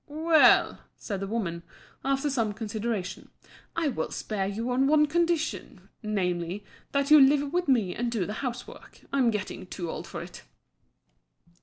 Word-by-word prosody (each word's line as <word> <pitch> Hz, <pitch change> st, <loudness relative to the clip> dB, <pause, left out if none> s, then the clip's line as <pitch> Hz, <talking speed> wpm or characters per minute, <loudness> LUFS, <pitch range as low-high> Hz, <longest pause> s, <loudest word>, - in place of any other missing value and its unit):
"Well," 315 Hz, +2 st, +4 dB, 0.2 s
said 200 Hz, -3 st, -5 dB
the 195 Hz, -, -4 dB
woman, 190 Hz, -6 st, -3 dB, 0.4 s
after 275 Hz, +2 st, 0 dB
some 225 Hz, -5 st, 0 dB
consideration, 215 Hz, -2 st, -4 dB, 0.5 s
"I 330 Hz, -3 st, +1 dB
will 255 Hz, -, -3 dB
spare 200 Hz, -3 st, -3 dB
you 225 Hz, +5 st, -3 dB
on 260 Hz, +2 st, +2 dB
one 300 Hz, +1 st, +5 dB
condition, 340 Hz, +1 st, -1 dB
namely, 185 Hz, -2 st, -2 dB, 0.3 s
that 280 Hz, +1 st, 0 dB
you 305 Hz, -, +10 dB
live 280 Hz, +2 st, +4 dB
with 355 Hz, -1 st, 0 dB
me 225 Hz, -9 st, +2 dB
and 240 Hz, 0 st, -2 dB
do 215 Hz, -6 st, -1 dB
the 210 Hz, -, -4 dB
housework; 245 Hz, -2 st, -7 dB
I'm 265 Hz, -4 st, +3 dB
getting 210 Hz, -3 st, -4 dB
too 175 Hz, -3 st, -5 dB
old 165 Hz, +2 st, -6 dB
for 170 Hz, 0 st, -6 dB
it." 175 Hz, -, -11 dB
235 Hz, 155 wpm, -27 LUFS, 195-280 Hz, 0.5 s, you